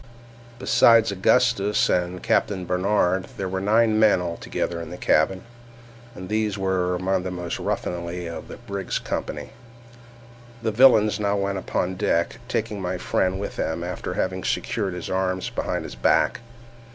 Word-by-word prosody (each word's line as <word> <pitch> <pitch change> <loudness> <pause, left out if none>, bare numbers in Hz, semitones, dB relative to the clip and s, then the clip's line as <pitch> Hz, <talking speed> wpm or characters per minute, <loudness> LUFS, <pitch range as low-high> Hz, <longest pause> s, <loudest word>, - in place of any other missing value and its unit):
Besides 115 -3 +5
Augustus 105 +1 +2
and 90 0 -1
Captain 95 -3 +1
Barnard, 95 0 +1
there 95 - -2
were 95 0 -3
nine 110 +2 +3
men 110 -4 +5
altogether 85 0 -3
in 85 - -7
the - - -7
cabin, 95 +6 +2 0.7
and 90 +1 -8
these 105 0 -1
among 95 0 0
the 95 - -4
most 90 -2 -4
ruffianly 85 0 -3
of 85 0 -7
the - - -9
brig's 100 -5 -4
company. - - -4 1.1
The 110 - +1
villains 110 -3 +5
now 100 -1 +1
went 100 -1 -1
upon 90 0 -2
deck, 95 +1 0
taking 110 -5 -2
my 90 0 -2
friend 95 +1 0
with 100 - -5
them 80 +1 -2
after 90 +1 -4
having - - -2
secured 100 -5 -1
his 90 - -6
arms 95 0 -1
behind - - -2
his - - -8
back. - - +2
95 Hz, 150 wpm, -24 LUFS, 90-105 Hz, 1.1 s, Besides